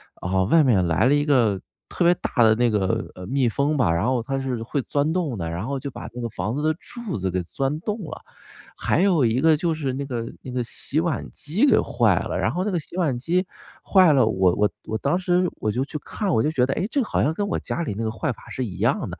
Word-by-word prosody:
啊， 95 +1 0
外 160 - +5
面 105 -10 +3
来 80 +6 +2
了 135 - +4
一 145 - +1
个 115 -10 +2 0.3
特 175 - -1
别 175 - +6
大 125 - -1
的 110 0 +5
那 120 -1 +2
个， 95 -3 -1
呃， 90 - -9
蜜 135 0 +1
蜂 140 +6 0
吧， 100 -10 +3
然 85 +4 0
后 125 -2 +1
它 135 +3 -2
是 125 -4 -3
会 135 +4 -2
钻 145 +2 0
洞 160 - -1
的， 85 - -3
然 90 +7 -4
后 140 0 -2
就 140 +1 -6
把 - - -8
那 125 - -6
个 120 - -2
房 110 +2 -3
子 150 - -2
的 155 0 +2
柱 235 - -6
子 95 0 -1
给 90 0 -1
钻 135 - -2
洞 210 +3 -3
了。 - - -8 0.6
还 165 - +1
有 180 -7 +3
一 115 +2 +1
个 160 -1 +5
就 170 +1 0
是 145 -4 -2
那 140 +2 -3
个 120 -4 -3 0.2
那 130 - -9
个 125 0 -1
洗 135 +5 -3
碗 170 -3 -2
机 185 - +1
给 - - +5
坏 - - +2
了， - - -3
然 - - +1
后 180 - -1
那 210 - -1
个 175 - 0
洗 160 - -10
碗 155 -9 +1
机 180 +8 0 0.4
坏 185 -4 +5
了， 130 -4 +4
我 95 -4 +2
我 105 0 +2 0.2
我 110 - -2
当 140 +10 0
时 180 0 +2
我 110 - -2
就 125 +5 -1
去 150 +2 -6
看， 195 +3 -2
我 - - +3
就 150 - +1
觉 125 -5 +2
得， 135 - -1
诶， 195 - -1
这 275 +1 +1
好 - - -1
像 150 - +2
跟 205 - -2
我 195 - -1
家 170 - -4
里 105 - -3
那 110 - -4
个 110 - 0
坏 130 +6 -2
法 - - -12
是 130 - -3
一 95 -5 -7
样 - - +1
的， - - -8
135 Hz, 295 characters per minute, -23 LUFS, 110-160 Hz, 0.6 s, 别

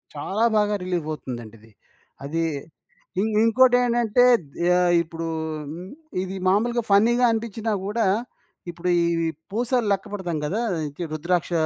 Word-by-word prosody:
చాలా 195 +9 -2
బాగా 210 0 +2
రిలీఫ్ 175 -4 -2
అవుతుందండి 120 -7 -7
ఇది. 110 +1 -20 0.5
అది 165 +4 -1 0.8
ఇంక్ 215 +1 0
ఇంకోటేంటంటే 245 -1 +4 0.4
యహ్, 180 0 +4
ఇప్పుడు 165 0 -6 1.0
ఇది 190 +1 -5
మామూలుగా 235 +5 +2
ఫన్నీ‌గా 235 +5 +5
అనిపించినా 225 0 -2
గూడా 220 +3 0 0.6
ఇప్పుడు 175 +1 -3
ఈ - - +2 0.5
పూసలెక్క 225 -3 0
పెడతాం 175 -5 -3
గదా! 200 +10 -1 0.3
ఇంకి 145 +4 -7
రుద్రాక్ష 170 +3 -1
200 Hz, 115 wpm, -24 LUFS, 170-230 Hz, 1.0 s, ఫన్నీ‌గా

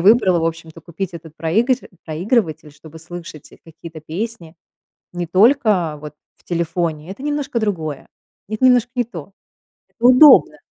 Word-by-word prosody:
выбрала, 190 -2 +4
в - - -1
общем-то, 165 0 -6
купить 175 +3 -6
этот 160 -1 -11
проигр 220 +11 +1 0.3
проигрыватель, 165 -1 -1
чтобы 155 +2 -14
слышать 165 -2 -10
какие-то 165 0 -12
песни 170 +1 -6 0.6
не 175 -1 -4
только 200 - +2
вот 150 0 -9 0.2
в - - -29
телефоне, 170 -2 -3
это 235 +7 -10
немножко 290 -4 -2
другое, 160 -10 -3 0.4
это 215 +4 0
немножко 245 -1 +4
не 245 - +1
то, 185 -5 -10 0.6
это 235 - -11
удобно. 255 +4 +7
175 Hz, 140 wpm, -19 LUFS, 160-225 Hz, 0.6 s, удобно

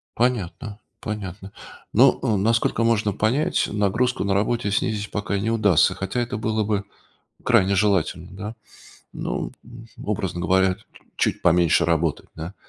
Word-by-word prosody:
Понятно, 110 -3 -1 0.2
понятно. 100 -2 -6 0.4
Ну, 125 +5 +5
э, 110 -6 +1
насколько 115 +2 +1
можно 110 -3 +2
понять, 130 - +1
нагрузку 110 +5 0
на 100 0 0
работе 105 +2 0
снизить 105 0 -1
пока 100 -1 -2
не 105 +3 -1
удастся, 105 -7 +3
хотя 95 +6 -2
это 120 +1 -3
было 110 0 0
бы 100 -1 -1 0.6
крайне 95 +1 +3
желательно, 95 -4 +1
да? 105 +4 -7 0.6
Ну, - - -4
м, 120 0 -13 0.2
образно 95 -4 -2
говоря, 95 +2 +3
т 105 - -22 0.3
чуть - - 0
поменьше 85 0 +4
работать, 80 -1 0
да, 80 +4 -7
105 Hz, 140 wpm, -23 LUFS, 95-115 Hz, 0.6 s, Ну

